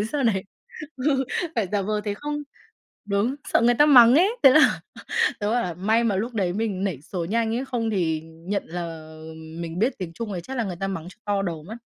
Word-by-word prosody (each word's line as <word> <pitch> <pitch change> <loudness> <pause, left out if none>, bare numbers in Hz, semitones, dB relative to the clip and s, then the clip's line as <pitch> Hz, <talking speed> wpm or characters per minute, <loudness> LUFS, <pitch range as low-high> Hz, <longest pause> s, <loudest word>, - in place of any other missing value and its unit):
Thế - - 0
sau 290 -2 0
này 195 -5 +1 0.5
ừ, 265 0 +1 0.3
phải 220 -6 0
giả 200 -1 +1
vờ 210 +1 -1
thế 205 -1 -2
không 295 +6 -4 0.6
đúng, 205 +6 0 0.2
sợ - - +5
người 240 +1 +5
ta 295 - +6
mắng 245 -4 +8
ấy. 360 +6 +5
Thế 270 - +10
là 310 +4 +5 0.6
tớ 205 0 0
bảo 240 +1 +2
là 175 -2 -3
"May 220 +6 +1
mà 210 -4 +1
lúc 230 +5 -3
đấy 185 -4 0
mình 200 -1 -2
nảy 165 -9 -3
số 175 +2 -4
nhanh," 225 +4 0
ấy 255 - -2
"không 235 -4 -2
thì 165 -6 0
nhận 165 +5 -4
là 165 -2 -7 0.2
mình 165 +1 -7
biết 235 +7 +1
tiếng 175 -3 -5
Trung 220 +1 -5
thì 175 - -3
chắc 265 +9 -7
là 235 - 0
người 185 -4 -4
ta 195 +3 -3
mắng 175 -3 -5
cho - - -17
to 200 -1 +1
đầu 165 -5 -4
mất." 220 +7 -8
205 Hz, 235 wpm, -24 LUFS, 175-235 Hz, 0.6 s, Thế